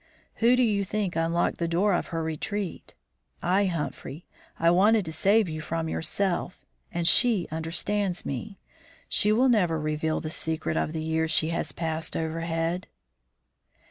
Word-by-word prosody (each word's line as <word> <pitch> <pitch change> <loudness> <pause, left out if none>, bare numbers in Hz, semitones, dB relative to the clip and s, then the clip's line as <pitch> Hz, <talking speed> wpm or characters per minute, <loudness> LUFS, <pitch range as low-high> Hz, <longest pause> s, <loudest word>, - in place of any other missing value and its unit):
"Who 235 +2 +4
do 250 - +3
you 205 -4 +1
think 200 -1 -2
unlocked 165 +1 0
the 170 - 0
door 185 +5 +2
of 175 - -1
her 165 -1 -3
retreat? 170 +4 -4 0.5
I, 190 +3 +2
Humphrey. 165 -2 -4 0.3
I 165 +1 +3
wanted 205 +3 +4
to 160 - -4
save 200 +6 +3
you 155 -1 -5
from 165 +1 -3
yourself, 180 +3 -2 0.3
and 170 -1 -1
she 225 -3 +5
understands 175 +4 -1
me. 190 - -5 0.5
She 210 - +3
will 245 +5 +4
never 180 -10 +2
reveal 155 +1 -1
the 155 - -5
secret 160 -1 -2
of 155 - -1
the 160 -1 -3
years 160 0 0
she 160 0 +3
has 165 - -2
passed 160 -1 -3
overhead." 165 +2 -2
170 Hz, 155 wpm, -26 LUFS, 160-200 Hz, 0.5 s, she